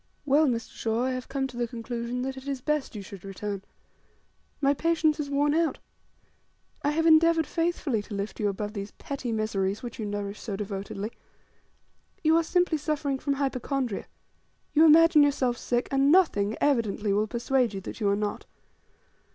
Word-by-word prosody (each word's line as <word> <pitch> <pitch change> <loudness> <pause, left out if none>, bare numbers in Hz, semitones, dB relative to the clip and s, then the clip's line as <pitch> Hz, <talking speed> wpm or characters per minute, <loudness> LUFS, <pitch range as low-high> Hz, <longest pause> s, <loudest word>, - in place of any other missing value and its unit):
"Well, 295 +2 +4
Mr. 235 -3 -2
Shaw, 225 +1 -1
I 260 - 0
have 255 0 -4
come 270 -1 -1
to 255 -2 -7
the 240 -1 0
conclusion 235 +1 -4
that 265 0 -3
it 265 +1 -10
is 275 -2 -2
best, 300 -2 -1
you 205 - -5
should 195 -1 -11
return. 195 0 -5 1.0
My 280 -1 +3
patience 320 0 +1
is 290 -2 -3
worn 290 +1 +2
out. 330 0 +1 1.0
I 285 - +1
have 320 +2 +1
endeavoured 325 0 +5
faithfully 330 -9 -1
to 205 0 -8
lift 200 +1 -4
you 210 - +1
above 205 +1 -4
these 200 -1 -5
petty 270 -4 -5
miseries 215 -2 -1
which 240 -1 -7
you 215 - -3
nourish 205 0 -4
so 210 -5 -4
devotedly. 200 +1 -5 1.1
You 315 0 +5
are 335 - +4
simply 350 -1 +1
suffering 285 -2 -1
from 280 - 0
hypochondria. 270 -4 -2 0.7
You 315 +2 +6
imagine 325 0 +7
yourself 270 -4 +2
sick, 240 0 -1
and 275 +1 +4
nothing, 225 - +3
evidently, 220 -7 +1
will 210 +2 +1
persuade 240 -1 0
you 195 - -4
that - - -8
you 205 -3 +1
are 200 - +3
not. 205 0 -3
255 Hz, 175 wpm, -27 LUFS, 210-295 Hz, 1.1 s, imagine